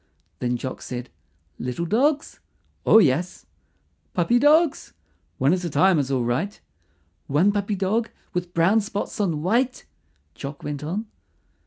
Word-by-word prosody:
Then 125 0 -1
Jock 130 +2 -6
said, 125 0 -6 0.5
"Little 125 +7 -3
dogs?" 280 - +1 0.5
"Oh, - - +8
yes." 175 -1 +2 0.7
"Puppy 210 +8 +3
dogs?" 305 +3 +3 0.4
"One 135 +5 +3
at 185 0 -1
a 170 - -2
time 170 +3 +4
is 135 -2 -1
all 130 -3 +1
right." 130 - -2 0.7
"One 155 +8 +3
puppy 205 0 -1
dog 210 +4 0 0.2
with 180 -1 -3
brown 190 +7 +4
spots 210 +2 -4
on 165 -6 -1
white?" 240 +7 0 0.5
Jock 140 - -8
went 145 0 -4
on. 190 +9 -3
180 Hz, 140 wpm, -24 LUFS, 145-215 Hz, 0.7 s, Oh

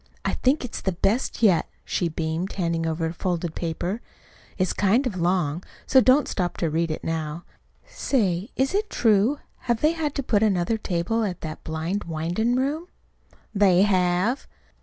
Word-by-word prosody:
I - - +1
think 260 +1 +1
it's 240 - -6
the 190 - -1
best 220 +7 0
yet," 185 -7 +4 0.2
she 175 - 0
beamed, 160 +3 -3
handing 165 -3 -1
over 160 0 -1
a 160 - -2
folded 175 -2 -2
paper. 175 +7 -3 0.6
"It's 185 -2 +1
kind 210 +7 +2
of 235 -6 -2
long, 175 -2 +1 0.2
so 265 - +6
don't 260 +4 +4
stop 180 -3 -2
to 165 -3 0
read 165 +2 0
it 155 - -4
now. 160 0 -3 0.4
Say, 200 -5 0
is 265 +5 +1
it 420 +2 0
true? 225 +4 +3 0.3
Have 235 -2 +2
they 305 - +4
had 315 -3 -2
to 275 - -1
put 210 -5 +2
in 215 -2 +4
another 185 +5 0
table 195 +5 -1
at 185 -5 -3
that 155 -1 -6
blind 160 +6 -3
windin' 175 +9 0
room?" 290 +7 -1 0.7
"They 195 -3 +5
have." 185 +4 +1
185 Hz, 175 wpm, -25 LUFS, 170-235 Hz, 0.7 s, so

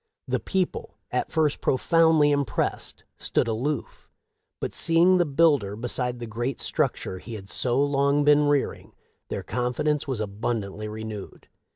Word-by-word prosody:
The - - 0
people, 205 - -2
at - - -1
first 155 -3 +1
profoundly 160 +1 +4
impressed, 140 -5 -1
stood - - 0
aloof, 125 +7 -3 0.5
but, - - -4
seeing 170 +2 +4
the 175 - +2
builder 140 -9 +3
beside 125 +2 -2
the 120 - -6
great 120 +4 -3
structure 95 - -1
he 115 - -8
had 100 -2 -8
so 125 +1 +1
long 140 0 +2
been 150 0 +5
rearing, 145 -1 -1 0.4
their - - -4
confidence 125 +6 -1
was 130 -5 -2
abundantly 105 0 -3
renewed. 110 -1 -8
135 Hz, 140 wpm, -25 LUFS, 110-150 Hz, 0.5 s, been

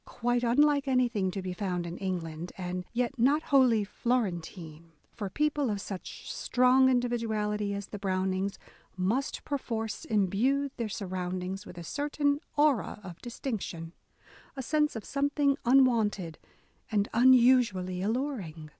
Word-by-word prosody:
Quite 245 0 -1
unlike 285 +3 +3
anything 240 -7 +2
to 190 0 -4
be 185 -1 -3
found 180 -2 -2
in 170 +1 -6
England: 175 -3 -4
and 180 -1 -4
yet 245 +2 -2
not 285 +6 +3
wholly 255 -6 +4
Florentine, 175 -8 -3 0.2
for 205 -4 -5
people 295 +1 0
of 205 -2 -1
such 195 -2 -7
strong 255 +1 +4
individuality 220 -5 0
as 200 0 -5
the 205 - -8
Brownings 190 0 -1 0.4
must 220 +10 -1
perforce 230 -6 -3
imbue 230 +8 +1
their 230 -3 -2
surroundings 185 0 -4
with 175 - -11
a 170 - -6
certain 285 - 0 0.2
aura 290 -8 +2
of 180 -3 -10
distinction, 215 -9 -5 0.3
— - - -24
a 265 - -3
sense 300 +2 +1
of 220 - -6
some 280 0 0
thing 285 -1 +2
unwonted 225 -9 +3 0.5
and 205 -1 +2
unusually 235 -7 +4
alluring. 205 - -3
220 Hz, 135 wpm, -29 LUFS, 185-260 Hz, 0.5 s, wholly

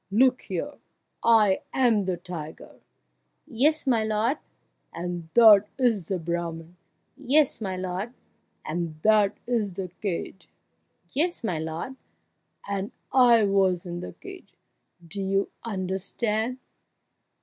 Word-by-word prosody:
Look 250 +5 +3
here - - -5 0.4
I 215 -4 +5
am 230 -6 +3
the 185 -1 -1
tiger 165 -3 -9 0.4
" - - -48 0.2
"Yes, 300 +7 +1
my 235 -5 +2
lord!" 220 +6 0 0.5
"And 175 -1 -5
that 215 -3 +8
is 230 - +1
the 190 - -1
Brahman 170 0 -4 0.3
" - - -47
"Yes, 280 -1 +2
my 190 -3 -3
lord!" 185 +4 -4 0.5
"And 160 -1 -4
that 215 -2 +4
is 225 -5 -1
the 185 0 -5
cage 190 -1 -4 0.3
" - - -38
"Yes, 335 0 0
my 180 -8 -1
lord!" 160 +11 -5 0.7
"And 200 0 -3 0.2
I 240 -4 +6
was 190 -3 +2
in 175 0 -5
the 180 - -7
cage 385 -1 -12 0.5
do 195 +4 -4
you 195 +1 0
understand?" 210 +4 -2
200 Hz, 125 wpm, -26 LUFS, 180-235 Hz, 0.7 s, that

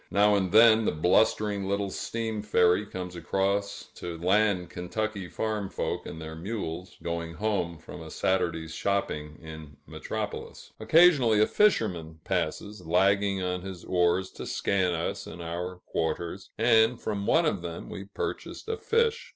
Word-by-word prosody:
Now 105 +1 +4
and 95 -3 +1
then 110 0 +7
the - - +2
blustering 100 +5 +2
little 100 0 -1
steam 110 0 -3
ferry 95 -1 +3
comes 90 -2 -6
across 100 +3 -1
to 85 -1 -6
land 95 +1 +2
Kentucky 100 +2 -3
farm 105 -3 -2
folk - - -3
and 80 - -7
their 80 0 -7
mules, 90 -1 -5
going 85 -1 -3
home 95 -4 -1
from 85 +1 -10
a 80 - -9
Saturday's 80 -3 -1
shopping 75 -7 -2
in 80 -2 -10
Metropolis. - - -6
Occasionally 130 -3 +5
a 105 - +6
fisherman 90 - +1
passes, 95 +3 -2
lagging 95 +3 +2
on 90 0 -2
his 95 -2 -8
oars 90 +1 +1
to - - -8
scan 95 -3 +1
us 80 - -3
and 85 - -9
our 85 +2 -4
quarters; 85 +4 -3
and 115 +1 +4
from 100 -2 -3
one 165 +1 +4
of 100 - 0
them, 85 -1 -6
we 100 - -7
purchased 100 - -5
a 450 - -1
fish. 455 0 +1
95 Hz, 150 wpm, -28 LUFS, 85-105 Hz, -, then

